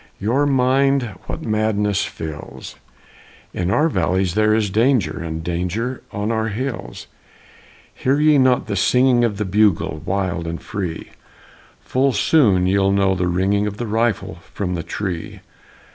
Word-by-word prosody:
Your 125 +8 +1
mind 135 0 +2 0.2
what - - -5
madness 105 -2 0
fills? 80 -2 -8 0.8
In 90 0 -2
our 150 +10 +3
valleys 95 - 0
there 110 +1 +2
is 105 -3 0
danger, 115 -4 +1
And 80 0 -5
danger 90 +9 -3
on 105 +2 -2
our 110 -1 0
hills! 120 +4 -5 0.9
Hear 135 +3 0
ye 150 -1 +5
not 130 -1 +3
the 105 - -3
singing 125 +4 +3
Of 110 -4 0
the 105 - -2
bugle, 95 -6 +1
wild 95 -3 -2
and 85 0 -4
free? 90 -6 -5 0.7
Full 135 +1 +1
soon 105 - +3
ye'll 95 +1 +2
know 100 -1 +2
the 90 -1 -1
ringing 95 +4 +1
Of 105 0 -5
the 120 - -3
rifle 110 -6 -1 0.2
from 90 -3 -2
the 85 - -2
tree! 90 0 -5
105 Hz, 145 wpm, -20 LUFS, 95-125 Hz, 0.9 s, ye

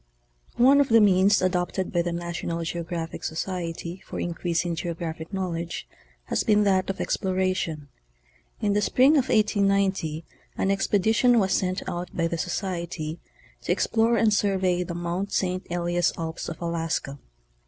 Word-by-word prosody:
One 270 +4 +6
of 280 - 0
the 230 0 +6
means 200 -1 +4
adopted 185 0 -1
by 175 - +3
the 175 - -2
Narionan 170 0 -3
GEOGRAPHIC 170 -1 -4
Socrery 170 +1 -4
for - - -7
increasing 170 0 -1
geographic 165 0 -5
knowledge 170 -3 -3 0.4
has - - -1
been 210 -1 +4
that 190 -2 +2
of 195 - -3
exploration. 185 -5 -1 0.8
Inthe 205 0 +2
spring 255 +7 +4
of 275 -4 +2
1890 195 -6 +1 0.3
an 195 - +1
expedition 220 +5 +3
was 190 -3 +2
sent 185 0 -1
out 175 -1 -4
by 165 - +1
the 165 0 -2
Society 170 -3 -3 0.4
to - - -2
explore 230 +1 +2
and 220 -2 +3
survey 190 -3 +1
the 175 -1 -4
Mt. 175 +3 -3
St. 185 -1 -1
Elias 175 0 0
alps 165 0 -4
of 165 - -7
Alaska. 165 -4 -2
180 Hz, 145 wpm, -25 LUFS, 170-200 Hz, 0.8 s, One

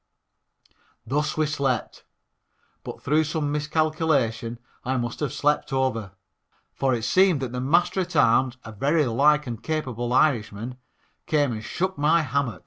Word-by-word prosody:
Thus 150 +7 -1
we 155 - +2
slept, 140 -6 -2 0.8
but - - -8
through 155 +3 +3
some 155 -1 -2
miscalculation 150 -6 0 0.3
I 130 +1 -1
must 120 -1 -3
have 145 -4 -2
slept 150 +1 0
over, 130 -7 -1 0.6
for 135 -2 +1
it 115 - -4
seems 185 +4 +4
that 130 -3 -3
the 125 0 -3
Master 175 +7 +2
at 180 -1 -5
arms, 130 -1 +3
a 110 - -7
very 145 +8 +1
large 150 +5 +3
and 120 -3 -6
capable 125 -6 -3
Irishman, 125 -3 +1 0.5
came 145 -5 +2
and 110 -1 -5
shook 185 +4 -3
my 155 +3 +3
hammock. 140 -5 -1
140 Hz, 145 wpm, -24 LUFS, 120-155 Hz, 0.8 s, seems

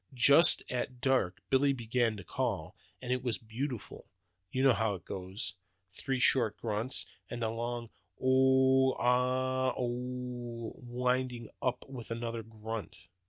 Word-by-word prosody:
Just 140 +7 +6
at 125 0 -3
dark 130 -9 +1
Billy 140 +1 +4
began 120 -2 0
to 100 - -8
call, - - -2 0.3
and 125 0 0
it 125 - -1
was 120 -3 -1
beautiful. 120 +2 -6 0.4
You 130 - 0
know 135 -2 +6
how 110 -2 0
it 90 - -11
goes. 95 +2 -4 0.4
Three 135 +5 -2
short 120 -3 +4
grunts, 115 +3 -1 0.2
and 120 -1 -4
then 110 - +1
a - - -4
long 120 0 -4 0.3
ooooo 130 0 +4
aaaa 130 +1 +1
ooooh, 125 -1 -4
winding 125 -1 -1
up 125 - -1
with 130 -4 -8
another 115 0 -3
grunt! 110 0 -6
125 Hz, 140 wpm, -32 LUFS, 115-130 Hz, 0.4 s, Just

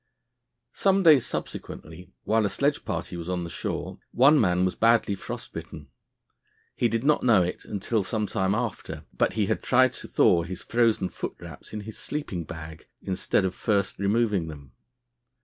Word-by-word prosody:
Some 195 0 +2
days 150 -7 +6
subsequently, 85 +4 -6
while 110 0 +2
a 100 - +1
sledge 145 +5 0
party 85 +2 -4
was 85 0 -6
on 90 -2 -2
shore, - - -4
one 140 +4 +5
man 90 -2 +2
was 95 - 0
badly 115 -2 +3
frost 95 - -7
bitten. 75 -3 -8 0.9
He 120 - +2
did 115 +1 -1
not 150 +1 +3
know 110 -7 +5
it 90 - -4
until 105 +2 -1
some 105 +3 -1
time 95 0 0
after, 120 -3 -4
but - - +1
he - - +1
had - - -1
tried - - +4
to - - -8
thaw 85 - +4
his 85 +2 -6
frozen 115 -5 +2
foot - - -5
wraps - - -10
in 105 - -5
his 110 +1 -8
sleeping 95 - -4
bag 80 0 -9 0.2
instead 95 +1 0
of 95 - -1
first 100 -1 0
removing 100 -3 +1
them. 70 -4 -10
100 Hz, 170 wpm, -26 LUFS, 90-115 Hz, 0.9 s, days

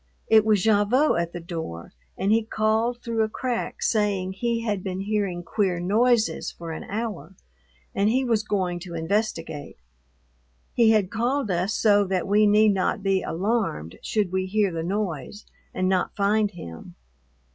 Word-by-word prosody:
It 220 -1 +6
was 215 -2 +2
Gavotte 220 - +3
at 170 0 -4
the 175 - -6
door 160 - -7 0.2
and 195 - 0
he 225 +1 +4
called 220 +2 0
through 230 -1 -1
a 215 - +1
crack 245 +1 -3
saying 200 -4 0
he 235 +3 -1
had 205 -4 -2
been 190 -1 -3
hearing 200 -4 -2
queer 185 -1 0
noises 220 +5 +2
for 165 -1 -8
an 160 - -6
hour 205 -3 -5 0.6
and 200 +2 +2
he 260 +3 +1
was 225 -3 +2
going 185 -5 -1
to 175 -1 -8
investigate. 165 -4 -2 1.0
He 230 -2 +4
had 210 -4 +3
called 240 0 0
us 180 +4 0
so 205 -2 +4
that 185 -1 -1
we 210 +2 +4
need 210 0 +5
not 195 +2 -1
be 195 -1 +2
alarmed 185 - -2
should 210 -5 -1
we 190 0 -1
hear 205 0 +1
the 165 -1 -3
noise 190 0 -3 0.3
and 185 - -1
not 185 -1 0
find 210 +1 +2
him. 85 - -10
205 Hz, 165 wpm, -25 LUFS, 180-220 Hz, 1.0 s, It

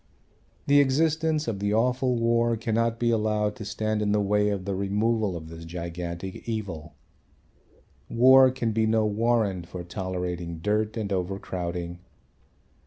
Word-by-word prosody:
The 145 0 +5
existence 155 +2 +2
of 110 -4 -2
the 100 +1 0
awful 125 +2 +1
war 115 0 +2
cannot 115 +1 0
be 120 0 +1
allowed 105 -1 0
to 105 - -7
stand 110 +1 -2
in 105 -1 +1
the 105 - +2
way 105 +1 +2
of 100 -3 -3
the 100 - -2
removal 105 0 0
of 80 -1 -9
this 80 0 -10
gigantic 85 +3 -6
evil. 85 -9 -5 1.1
War 130 +2 +7
can 125 -3 -2
be 110 0 +1
no 110 0 +2
warrant 105 -4 0
for 90 0 -7
tolerating 90 -2 -4
dirt 105 +5 -1
and 105 -3 -2
overcrowding. 90 -2 -4
105 Hz, 145 wpm, -26 LUFS, 90-115 Hz, 1.1 s, War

